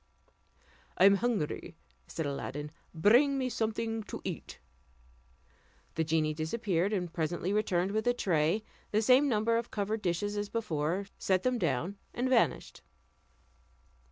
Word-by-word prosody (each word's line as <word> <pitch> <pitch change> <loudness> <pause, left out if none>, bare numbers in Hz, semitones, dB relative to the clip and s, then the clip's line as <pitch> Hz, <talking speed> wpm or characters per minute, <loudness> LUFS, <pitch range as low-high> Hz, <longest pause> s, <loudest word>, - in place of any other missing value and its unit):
"I 185 - +6
am 200 0 +7
hungry," 220 -9 -2 0.3
said 160 - -4
Aladdin, 145 +1 -4 0.2
"bring 240 - +4
me 260 -1 0
something 225 -1 -2
to - - -6
eat." - - -6 1.4
The 165 - 0
genie 155 -1 +1
disappeared, 180 +3 -1
and 180 -5 -2
presently 175 +3 -1
returned 195 -3 +1
with 220 +3 -1
a 245 - +4
tray, 170 0 +1 0.3
the 215 +1 +1
same 260 +5 +5
number 230 0 +2
of 235 0 -3
covered 210 +1 -2
dishes 205 +3 -1
as 205 0 -2
before, 175 -3 -1
set 185 -1 +1
them 255 -1 +1
down, 170 - -1 0.2
and 250 +2 0
vanished. 255 -3 +1
200 Hz, 135 wpm, -31 LUFS, 165-225 Hz, 1.4 s, am